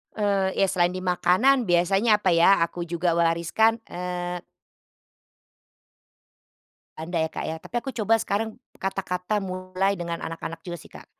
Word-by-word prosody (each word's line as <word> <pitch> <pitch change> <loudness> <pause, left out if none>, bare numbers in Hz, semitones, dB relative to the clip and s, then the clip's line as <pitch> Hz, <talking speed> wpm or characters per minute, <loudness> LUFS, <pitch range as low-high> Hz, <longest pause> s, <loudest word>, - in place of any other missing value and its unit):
Eee, 200 -2 +1
iya 195 - +4
selain 175 -1 +2
di 185 - -5
makanan 185 +9 +3
biasanya 195 +4 +3
apa 185 -4 +2
ya, 175 +3 +6
aku 175 +1 -6
juga 170 0 0
wariskan, 170 +7 +2
eee 180 0 -4 2.6
Ada 165 +2 -3
ya, - - -22
Kak, - - -5
ya. 160 - -3
Tapi, - - -10
aku 270 - -6
coba 225 0 +2
sekarang 220 +4 -2 0.2
kata-kata 190 +1 -2
mulai 185 +1 -1
dengan 170 -1 -4
anak-anak 165 0 -6
juga 175 0 -4
sih, - - -16
Kak. - - -12
185 Hz, 145 wpm, -25 LUFS, 175-200 Hz, 2.6 s, ya